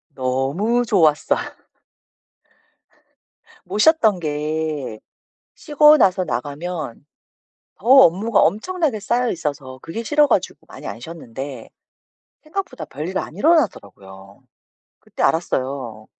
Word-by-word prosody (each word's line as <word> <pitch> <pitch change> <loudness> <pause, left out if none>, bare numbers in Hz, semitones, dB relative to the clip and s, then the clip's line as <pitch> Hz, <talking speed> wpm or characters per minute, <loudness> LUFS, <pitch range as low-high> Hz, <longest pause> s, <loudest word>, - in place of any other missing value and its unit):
너무 135 - 0
좋았어. 160 -8 +2 2.3
못 190 +3 -5
쉬었던 225 - +4
게 150 -5 -3 0.6
쉬고 300 0 +5
나서 185 -6 +2
나가면 145 +2 -5 0.7
더 - - -15
업무가 225 -4 +5
엄청나게 295 - 0
쌓여 240 +4 0
있어서 140 -5 -5
그게 220 +8 -6
싫어 295 +5 +3
가지고 190 -8 -1
많이 - - -11
안 115 - -7
쉬었는데 135 -4 -8 0.7
생각보다 320 - -6
별일이 155 +7 -5
안 155 - -7
일어나더라고요. 100 - -1 0.6
그때 - - -7
알았어요. 130 -8 -1
165 Hz, 240 characters per minute, -20 LUFS, -, 2.3 s, 쉬고